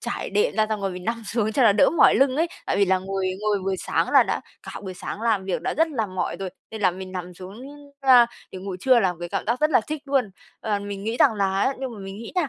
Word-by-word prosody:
trải - - -4
đệm 450 +4 +1
ra 215 0 +3
xong 215 -2 -2
rồi 195 - -1
mình 180 0 -8
nằm 230 +2 -2
xuống 220 -1 -1
cho 260 - +2
nó 220 - +6
đỡ 200 - +4
mỏi 330 - +5
lưng 265 0 +3
ấy. 330 +3 +2 0.2
Tại - - 0
vì 200 - +4
là 190 -1 +2
ngồi 195 0 -3
ngồi 210 -1 +1
buổi 195 -1 -1
sáng - - -1
là - - +7
đã - - -2 0.2
cả - - -8
buổi 190 -2 -6
sáng 195 - -6
làm 220 -5 +1
việc 190 - -2
đã - - -2
rất 325 +2 +2
là 240 -8 -2
mỏi 185 -1 -3
rồi, 190 -1 -5 0.2
nên 220 -1 -7
là 185 - +4
mình 185 +1 -8
nằm 180 -1 -6
xuống, 190 +5 -10 0.4
a, 255 -3 +7 0.3
để 185 - -6
ngủ 190 0 -6
trưa 255 +2 +5
là 190 -4 +2
một - - -15
cái 175 - -4
cảm - - -3
giác 235 +3 0
rất 305 +1 +3
là 275 - +5
thích 305 -1 -5
luôn. 270 -7 0 0.3
Ờ 210 -2 -1
mình 200 0 -6
nghĩ 225 +2 -2
rằng 255 -3 +4
là 195 -1 0
á 270 - +1
nhưng 260 -2 -4
mà - - -10
mình 195 0 -8
nghĩ 230 - -8
nha 355 -6 +1
210 Hz, 300 wpm, -24 LUFS, 190-250 Hz, 0.4 s, là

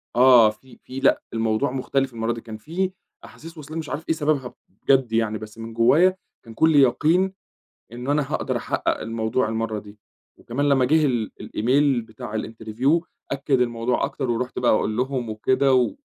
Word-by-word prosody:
آه 120 -3 +7
في 115 +5 -13
في 130 +1 -7
لأ - - +3
الموضوع 115 +4 0
مختلف 135 0 -1
المرّة 115 0 -1
دي 115 - -8
كان 110 -2 -9
في 180 - -2 0.3
أحاسيس 165 +1 -13
وصلاني 155 +2 -7
مش 155 - -6
عارف 155 +3 -6
إيه 160 - +2
سببها 145 -5 -1 0.2
بجد 125 +4 +1
يعني، 110 -1 +1
بس 110 0 -11
من 115 0 -8
جوايا 160 +11 +4 0.3
كان 115 - -11
كُلّي 160 +2 +4
يقين 170 +9 +2 0.6
إنه 125 +4 -4
أنا 145 -2 0
هاقدر - - -1
أحقق - - -1
الموضوع 115 +1 -1
المرّة 110 -1 -2
دي، 105 +1 -15 0.4
وكمان 145 +5 -2
لمّا 135 -2 +4
جه 155 +3 +3
ال 120 -5 -1
الEmail 130 0 +1
بتاع 110 -1 -6
الinterview 115 +8 -1 0.3
أكد 135 -1 +1
الموضوع 120 0 0
أكتر، 130 -4 -4
ورُحت 125 +2 -2
بقى 125 - +3
أقول 110 0 +1
لهم 125 -2 -2
وكده 130 +5 +1
و 125 -1 +2
125 Hz, 175 wpm, -23 LUFS, 115-140 Hz, 0.6 s, آه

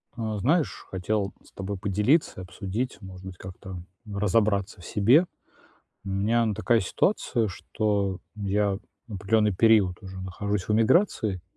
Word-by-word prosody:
А, 110 -2 -3
знаешь, 155 - +1
хотел 100 +2 -1
с - - -20
тобой 95 +1 -5
поделиться 105 - +1
и - - -5
обсудить, 105 +7 -4
может 95 -1 -10
быть, 95 -1 -8
как-то 95 -1 -9 0.3
разобраться 100 -1 +1
в - - -12
себе. 120 - +4 0.8
У - - -5
меня, 110 +5 +2
ну 110 - 0
такая 115 +3 +2
ситуация, 115 - +1
что 100 -1 -1 0.2
я 100 -1 0 0.3
определённый 105 0 +1
период 105 -4 +4
уже 95 -1 -8
нахожусь 95 +1 -3
в 105 - +1
эмиграции, 110 - +2
100 Hz, 140 wpm, -26 LUFS, 95-110 Hz, 0.8 s, себе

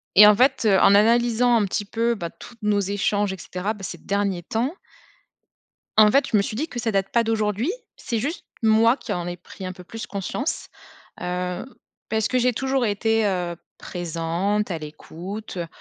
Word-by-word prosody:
et 210 +2 +10
en 210 - +7
fait, 255 0 +3
en - - +7
analysant 235 +3 +4
un 225 - +3
petit 200 +2 -2
peu, 230 +3 0
bah, 170 -5 -5
toutes 235 +6 -14
nos 210 -1 +2
échanges 200 +1 0
et - - -7
cetera, 185 +4 -3
bah 205 -3 -12
ces 180 - -5
derniers 200 -3 -1
temps 235 - -1 1.2
en 215 -1 +8
fait, 275 +3 +4
je 215 - +4
me - - +4
suis 205 - -4
dit, 300 +8 -2
que 245 - -6
ça 230 -1 -1
date 195 -1 0
pas 235 - +3
d'aujourd'hui. 220 - 0 0.3
C'est 230 -3 -2
juste 290 +10 -3 0.2
moi, 225 +2 +5
qui - - -7
en 175 -1 -3
ai 175 0 -5
pris 185 +2 -10
un 185 - -4
peu 180 - -12
plus 220 +4 -7
conscience. 200 - -3 0.5
Heu, 180 0 -3 0.4
parce 220 -1 0
que 255 - +1
j'ai 250 0 +3
toujours 265 +2 0
été, 220 +1 +1
heu 180 -3 -1 0.2
présente, 175 +4 -2
à 170 - -2
l'écoute, 175 +7 -8
heu, 170 - -2
210 Hz, 195 wpm, -23 LUFS, 185-230 Hz, 1.2 s, et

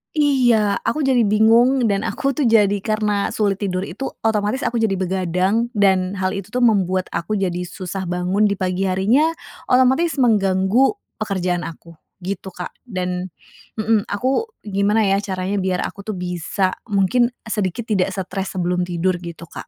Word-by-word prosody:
iya, 245 -9 +3
aku 295 +7 0
jadi 265 -2 +3
bingung 230 +5 +4
dan 200 -3 +1
aku 275 - -1
tuh 275 -1 0
jadi 205 -3 +4
karena 210 -1 0
sulit 200 -3 0
tidur 185 -2 -2
itu, 205 +8 -5 0.2
otomatis 220 +3 0
aku 235 - 0
jadi 220 -3 +1
begadang, 185 +4 0
dan 190 -2 +2
hal 185 -1 -1
itu 195 -1 -5
tuh 245 +4 -1
membuat 190 -5 +2
aku 215 +6 -2
jadi 185 -3 -1
susah 185 +1 -5
bangun 180 +4 +1
di 200 - 0
pagi 185 0 -1
harinya, 210 +12 +3 0.4
otomatis 260 +6 +3
mengganggu 215 - +3 0.3
pekerjaan 180 -4 -1
aku, 165 +1 -11 0.3
gitu, 190 +1 -4
Kak. 180 - -6 0.2
Dan 180 -3 -3 0.5
mhm, 215 -1 +1
aku 260 - 0 0.2
gimana 205 +2 +1
ya, 195 0 +2
caranya 195 0 -2
biar 185 -1 -1
aku 200 +1 -7
tuh 215 - -2
bisa, 180 +1 -1 0.2
mungkin 210 +4 +2 0.2
sedikit 210 0 -2
tidak 190 -2 +2
stres 190 0 -4
sebelum 180 0 0
tidur 175 +1 0
gitu, 170 -1 -8
Kak? 170 - -10
200 Hz, 160 wpm, -20 LUFS, 185-225 Hz, 0.5 s, bingung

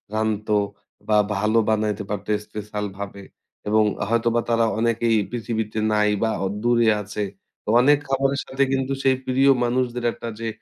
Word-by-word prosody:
রানতো 110 -1 0 0.5
বা 105 -1 +3 0.2
ভালো 110 +2 +1
বানাইতে 105 -1 0
পারত 105 -1 -4 0.2
স্পেশাল 105 0 -5
ভাবে। 100 0 -7 0.4
এবং 110 +1 +4 0.3
হয়তোবা 115 0 +2
তারা 115 -1 +3
অনেকেই 115 0 +2 0.2
পৃথিবীতে 110 -2 -3
নাই 105 0 +3
বা 110 - +2 0.3
দূরে 120 -1 +3
আছে। 105 +1 -4 0.4
তো - - -39
অনেক 145 +2 +5
খাবারের 135 +1 +1
সাথে 135 +1 0
কিন্তু 135 0 0
সেই 135 -1 +4
প্রিয় 135 +2 +3
মানুষদের 120 0 -1
একটা 115 - -8
যে, 115 - -3
115 Hz, 145 wpm, -23 LUFS, 105-125 Hz, 0.5 s, অনেক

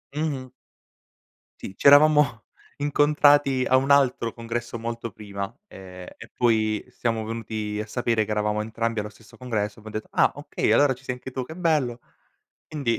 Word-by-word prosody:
Mh-mh. 140 -5 -3 1.1
Sì, 95 - -8
c'eravamo 145 -4 +5 0.3
incontrati 145 -2 +3
a 130 - +5
un 135 +2 +1
altro 130 -5 +3
congresso 115 0 -5
molto 115 0 -5
prima, 100 -1 -7
ehm, 90 -1 -11
e - - -12
poi 110 -3 +1
siamo 115 -3 -2
venuti 110 -1 -4
a 105 - -3
sapere 115 -1 0
che 105 - -6
eravamo 105 0 0
entrambi 115 +1 -2
allo 105 0 -4
stesso 110 +1 -19
congresso, 110 -5 -3
abbiam 110 0 -10
detto: 110 0 -5
"Ah, - - +3
okay! - - -2
Allora 145 -2 +4
ci 130 +1 -17
sei 125 -1 -3
anche 125 - -9
tu, 130 0 -4
che 160 - -10
bello!" 150 -9 0 0.7
Indi 140 -7 -1
115 Hz, 160 wpm, -24 LUFS, 110-135 Hz, 1.1 s, c'eravamo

